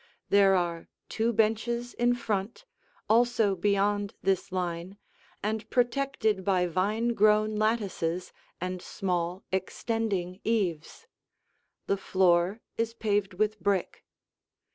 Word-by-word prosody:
There 195 -1 +5
are 170 -2 -1 0.2
two 230 +1 0
benches 230 +2 0
in 240 0 +2
front, 220 - -3 0.4
also 225 -3 +3
beyond 205 +2 +1
this 195 0 0
line 180 +1 -3 0.5
and 220 +1 -2
protected 245 -5 +1
by 185 -2 +2
vine 205 +7 0
grown 215 -1 +3
lattices 195 -6 -1 0.3
and 185 0 -4
small, 180 -1 -2
extending 190 -1 -2
eaves. 195 - -1 0.8
The 200 - +1
floor 185 +2 +2 0.2
is 230 0 -1
paved 205 -4 0
with 215 +2 0
brick. 200 -3 -1
205 Hz, 105 wpm, -28 LUFS, 185-225 Hz, 0.8 s, There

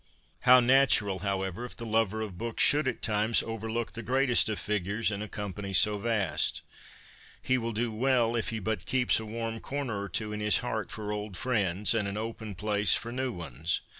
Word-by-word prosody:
How 125 +1 +8
natural, 120 -6 +4
however, 95 +2 -3
if 125 - -8
the 115 - -7
lover 110 -1 0
of 105 -4 -5
books 115 +4 -1
should 145 -1 +4
at 130 - -3
times 110 +1 +2
overlook 115 +1 -4
the 115 - -6
greatest 125 -2 +2
of 110 - -2
figures 105 +2 -1
in 100 0 -4
a 105 - -4
company 100 -1 -5
so 105 +2 +4
vast! 100 -9 0 0.8
He 130 0 0
will 115 0 -3
do 115 +1 -2
well 120 0 +1
if 115 - -1
he 115 - -3
but 105 -2 -3
keeps 125 -2 +2
a 110 - -7
warm 115 +1 -4
corner 130 -8 -3
or 100 - -5
two 105 +4 -2
in 105 - -4
his 105 0 +4
heart 110 -5 -3
for 105 -1 -5
old 105 -2 -5
friends 105 -5 +1
and 110 -3 0
an 100 +1 -4
open 110 -2 -5
place 105 0 +2
for 115 - -4
new 130 +1 -2
ones. 80 - -3
110 Hz, 200 wpm, -29 LUFS, 100-115 Hz, 0.8 s, How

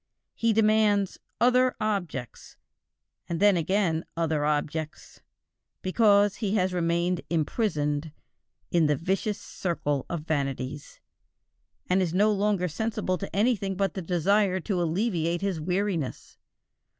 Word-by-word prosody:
He 230 0 +1
demands 215 -2 +2 0.2
"other 250 +1 +4
objects," 175 - -4 0.7
and 170 -1 -2
then 205 0 +5
again 170 -1 +1
other 160 -3 0
objects, 150 +1 -3 0.6
because 205 0 +3
he 210 -2 -1
has 185 -2 +1
remained 170 0 0
imprisoned 155 -3 -1 0.6
"in 165 -3 +3
the 150 - +2
vicious 190 +7 -1
circle 145 -6 -3
of 170 -3 -3
vanities," 140 -2 -3 0.9
and 185 +1 +2
is 175 -2 -1
no 210 +3 +4
longer 200 -3 +1
sensible 185 +1 -2
to 195 - -6
anything 200 -3 +1
but 195 -2 0
the 190 - -4
desire 185 +3 +2
to 185 -1 -1
alleviate 170 -1 0
his 195 -5 -2
weariness. 180 -4 -2
185 Hz, 120 wpm, -27 LUFS, 160-205 Hz, 0.9 s, then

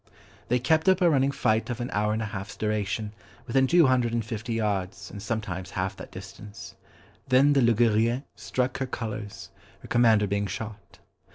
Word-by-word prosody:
They 125 - +2
kept 160 +8 +2
up 185 -1 +4
a 175 - +5
running 135 -2 +3
fight 110 -4 0
of 120 -1 -3
an 120 - -4
hour 105 +1 +1
and 110 +1 -1
an 110 - -4
half's 95 -1 -7
duration, 105 0 -2 0.3
within 130 +2 +2
two 170 +2 +5
hundred 125 -3 +2
and 115 -2 -1
fifty 115 +1 -4
yards, 105 -2 -2
and 100 - -8
sometimes 100 -5 -4
half 95 +1 -3
that - - -10
distance. 95 +1 -10 0.5
Then 135 +3 +5
the 140 - +3
Ligurienne 115 +1 +3
struck 125 0 -2
her 135 - -1
colours, 110 -4 -6 0.3
her - - -11
commander 115 -3 +4
being 100 +1 -1
shot. 100 +1 -7
110 Hz, 180 wpm, -26 LUFS, 100-125 Hz, 0.5 s, a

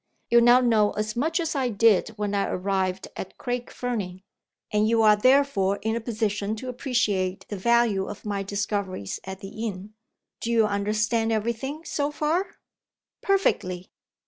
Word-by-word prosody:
You 235 0 +7
now 240 +2 +6
know 220 -4 +3
as 215 0 -3
much 320 +8 0
as 325 -2 -1
I 260 -3 +1
did 220 -2 +4
when 205 -1 -2
I 200 -1 +1
arrived 190 0 -1
at 190 - -7
Craig 245 0 -3
Fernie 200 -7 -4 0.5
and 210 +1 +2
you 225 -1 +3
are, 210 -1 +7
therefore, 230 -5 +3
in 220 +1 0
a 235 - -2
position 215 -2 -2
to 255 +4 -6
appreciate 210 -8 -1
the 205 - -3
value 225 -2 +2
of 205 - -8
my 200 -1 -2
discoveries 200 - -3
at 190 +1 -7
the 220 +3 -5
inn. 200 +1 -7 0.5
Do 230 - -4
you 225 -2 +4
understand 215 +2 0
every 225 +1 0
thing, 280 +7 -6
so 285 0 -1
far?" 310 +6 -1 0.7
"Perfectly!" 185 - 0
215 Hz, 165 wpm, -25 LUFS, 200-240 Hz, 0.7 s, You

